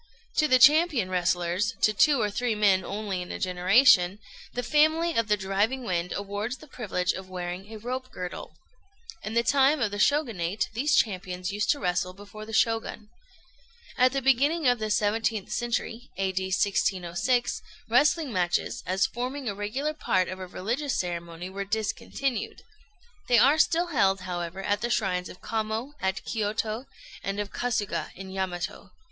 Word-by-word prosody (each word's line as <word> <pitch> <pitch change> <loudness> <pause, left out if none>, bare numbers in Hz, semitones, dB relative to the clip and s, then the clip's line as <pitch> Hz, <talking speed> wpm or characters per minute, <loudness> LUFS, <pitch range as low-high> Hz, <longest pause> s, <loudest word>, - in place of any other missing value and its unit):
To 305 - +4
the 255 -3 +5
champion 290 - +5
wrestlers 180 +3 0
to 215 - +5
two 285 +6 +4
or 210 -2 0
three 240 +1 -1
men 200 -3 +3
only 200 -1 -3
in 180 - -7
a - - -4
generation 185 +1 +4 0.3
the 245 - -3
family 315 +4 +3
of 230 -2 +1
the 210 0 +2
"Driving 205 +7 0
Wind" 180 -5 -2
awards 205 +5 -3
the - - -14
privilege 190 -10 -2
of 190 0 -8
wearing 180 +2 -6
a 220 - -7
rope 255 +4 -5
girdle. 180 -5 -7 0.7
In 215 +1 -5
the 235 - +3
time 280 +3 +4
of 215 -4 0
the 205 - -4
Shogunate 215 - +1
these 285 +6 +2
champions 185 -2 0
used 205 +1 -2
to 290 - +3
wrestle 180 0 -1
before 205 +2 -11
the - - -8
Shogun. 225 -1 0 0.9
At 255 0 +4
the 275 0 -2
beginning 280 +5 +3
of 245 -1 +3
the 215 - -2
17th 215 0 0
century 240 0 -2
(A.D. 190 -1 -1
1606) 200 +3 0 0.3
wrestling 285 +3 +3
matches, 175 -2 0
as 190 +2 +2
forming 255 +3 -4
a 205 - -1
regular 220 +10 -2
part 185 -11 +1
of 185 +1 -6
a 185 - -6
religious 240 +11 -2
ceremony, 170 -1 -4
were 195 +1 -5
discontinued. 220 +4 -3 0.6
They 240 - +5
are 275 +7 +5
still 340 +2 +3
held, 195 -6 +3
however, 180 0 -5
at 205 +1 0
the 240 - -1
shrines 185 -6 0
of - - -13
Kamo, 220 +5 -3
at 190 0 -2
Kiôto, 220 +2 -2 0.3
and 195 +1 -3
of 205 -1 -3
Kasuga, 235 -5 -2
in 190 +1 -9
Yamato. 190 0 -4
210 Hz, 165 wpm, -27 LUFS, 185-245 Hz, 0.9 s, the